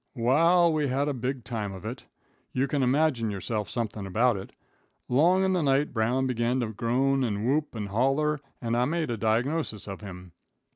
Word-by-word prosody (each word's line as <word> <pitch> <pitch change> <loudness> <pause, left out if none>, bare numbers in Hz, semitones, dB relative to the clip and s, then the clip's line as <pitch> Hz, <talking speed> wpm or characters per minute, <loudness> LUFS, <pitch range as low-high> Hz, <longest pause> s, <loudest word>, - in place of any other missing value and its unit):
Wa'al 165 +8 +4
we 150 -2 +1
had 135 +2 0
a 145 - 0
big 130 0 -3
time 105 -4 -4
of 95 0 -10
it. 120 +4 -6 0.5
You 130 +2 +1
can 140 +1 -1
imagine 130 -3 +2
yourself 105 +1 -3
somethin' 110 -4 -3
about 115 +5 +2
it. 95 0 -7 0.6
Long 175 +9 +4
in 190 0 +2
the 180 - +1
night 140 0 +1
Brown 125 +3 +1
began 125 0 0
to 115 - -2
groan 130 +5 +1
and 105 -3 -1
whoop 145 +1 0
and 105 -2 -4
holler, 135 +7 +1 0.2
and 115 -1 -1
I 120 +1 +2
made 160 -2 -1
a - - 0
diagnosis 115 - -1
of 95 +1 -7
him. 90 -3 -9
125 Hz, 190 wpm, -27 LUFS, 110-145 Hz, 0.6 s, Wa'al